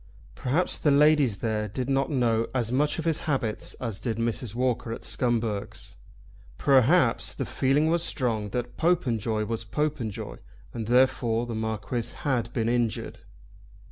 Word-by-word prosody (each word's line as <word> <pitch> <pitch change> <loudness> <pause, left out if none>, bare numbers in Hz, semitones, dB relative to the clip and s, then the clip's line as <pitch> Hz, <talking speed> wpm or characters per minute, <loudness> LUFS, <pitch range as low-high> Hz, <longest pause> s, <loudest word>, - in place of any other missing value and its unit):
Perhaps 150 +8 0
the 150 - +2
ladies 145 -6 +4
there 105 -1 0
did 125 +5 -4
not 135 0 +1
know 115 -5 +1
as 120 -3 0
much 145 +4 +1
of 165 - -4
his 165 -2 +1
habits 120 -7 -2
as 115 -6 -5
did 115 -3 -2
Mrs. 115 -1 -2
Walker 125 -2 0
at 115 - -6
Scumberg's. 115 -4 -2 0.6
Perhaps 135 0 +3
the - - -3
feeling 135 +3 +2
was 170 +1 +2
strong 115 -9 -1
that 120 +2 -4
Popenjoy 115 - +1
was 115 +1 -3
Popenjoy, 135 -3 -3 0.4
and 115 -3 -4
that - - -3
therefore 120 -2 +3
the 120 - -5
Marquis 110 +2 -3
had 125 -5 0
been 115 -2 -1
injured. 120 -2 -1
120 Hz, 150 wpm, -27 LUFS, 115-135 Hz, 0.6 s, ladies